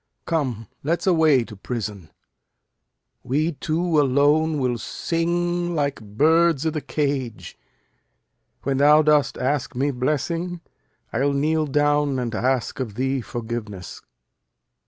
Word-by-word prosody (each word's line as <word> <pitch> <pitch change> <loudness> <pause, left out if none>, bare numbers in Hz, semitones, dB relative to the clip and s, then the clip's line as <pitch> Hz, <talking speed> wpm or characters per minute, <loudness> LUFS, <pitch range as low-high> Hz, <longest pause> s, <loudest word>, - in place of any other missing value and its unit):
Come, 130 -9 -1 0.2
let's 165 +4 -1
away 160 -8 +4
to 110 -2 -11
prison. 105 -5 -5 1.1
We 155 +6 0
two 160 +2 0
alone 145 +3 +3
will 125 -3 0
sing 175 +4 -1
like 140 -4 -1
birds 155 +8 +2
i' 160 - +2
th' 155 -1 -5
cage. 140 -6 -2 1.1
When 135 0 0
thou 150 +2 +6
dost 150 -2 +3
ask 135 0 -1
me 140 +3 +1
blessing, 165 +7 -2 0.5
I'll 140 +5 +1
kneel 155 +2 +1
down 145 -1 +2
And 120 -2 -2
ask 125 +3 -1
of 115 -6 -4
thee 130 +2 0
forgiveness. 110 -6 -6
145 Hz, 115 wpm, -23 LUFS, 125-155 Hz, 1.1 s, thou